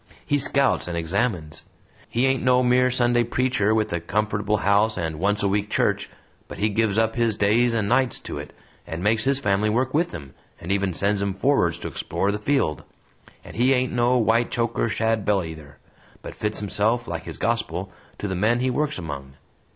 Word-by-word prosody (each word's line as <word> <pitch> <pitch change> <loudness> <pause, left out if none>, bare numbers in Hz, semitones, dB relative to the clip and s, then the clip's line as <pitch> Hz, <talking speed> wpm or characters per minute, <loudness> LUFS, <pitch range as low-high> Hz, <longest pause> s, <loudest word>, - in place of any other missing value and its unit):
He 145 - +1
scouts 140 -4 +2
and 85 -1 -3
examines; 85 -2 -2 0.5
he 120 +3 +1
ain't 135 -1 +1
no 125 0 +3
mere 125 +1 +3
Sunday 120 -1 +2
preacher 120 -3 +1
with 110 -5 0
a 85 - 0
comfortable 105 +3 -1
house 100 +2 +2
and 80 -3 -3
once 105 +3 +1
a - - +3
week 100 +1 0
church, - - 0 0.4
but - - -9
he 105 - +1
gives 105 -1 0
up 110 0 +1
his 115 -3 +1
days 115 +4 +3
and 110 -3 0
nights 130 +1 +2
to - - -6
it, - - -8 0.4
and 85 +2 -5
makes 110 +2 +2
his 135 0 +2
family 105 -4 +1
work 125 +4 0
with 165 +4 +1
him, 70 -5 -9 0.3
and 85 - -5
even 100 -3 0
sends 100 0 +1
'em 100 -1 -1
forward 100 - +2
to 85 - -6
explore 100 - -2
the 105 - -3
field. 105 - 0 0.6
And - - -12
he 125 +4 +3
ain't 130 -1 0
no 120 +1 +2
white 115 0 +2
choker 115 0 -1
shadbelly 105 -5 0
either, 75 -3 -12 0.5
but - - -7
fits 105 0 -3
himself, 110 +4 0
like 85 0 -5
his - - -7
gospel, 95 -5 -2 0.3
to 105 - -4
the 95 - -3
men 110 +6 +2
he 130 +1 0
works 150 +3 -1
among. 70 -6 -7
105 Hz, 195 wpm, -23 LUFS, 95-120 Hz, 0.6 s, no